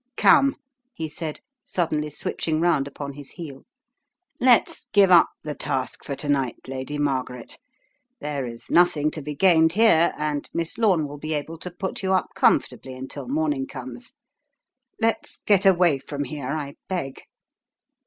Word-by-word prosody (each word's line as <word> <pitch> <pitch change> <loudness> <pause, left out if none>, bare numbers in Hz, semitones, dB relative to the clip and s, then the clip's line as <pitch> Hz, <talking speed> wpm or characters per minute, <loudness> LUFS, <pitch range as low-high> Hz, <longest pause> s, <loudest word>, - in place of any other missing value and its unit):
" - - -48
Come," 275 -1 +5 0.4
he 160 - -4
said, 155 0 -6 0.2
suddenly 155 -4 -1
switching 155 +1 -2
round 165 -5 +2
upon 140 0 -7
his 140 -1 -10
heel. 145 -6 -9 0.7
"Let's 245 -2 +3
give 200 -2 +6 0.3
the 150 - -4
task 135 -2 -3
up - - -18
for 140 - -3
to 145 - -5
night, 135 -4 0
Lady 130 +2 -5
Margaret. 130 -4 -3 0.6
There 145 -3 -3
is 115 0 -9
nothing 155 -4 +4
to 155 - -5
be 150 +1 -6
gained 160 -1 +5
here, 190 -6 +5
and 150 -1 -2
Miss 165 +4 -2
Lome 185 -9 +3
will 145 0 -9
be 155 +1 -2
able 155 +3 -5
to 180 - -5
put 185 +2 -5
you 190 -1 +2
up 185 - 0
comfortably 130 -1 +1
until 130 +1 -7
morning 145 -1 0
comes. 130 - -8 0.9
Let's 225 0 0
get 200 -1 +4
away 175 -6 +4
from 145 +1 -5
here, 145 -3 -5
I 145 0 -4
beg." 170 -8 -3
150 Hz, 160 wpm, -24 LUFS, 140-175 Hz, 0.9 s, give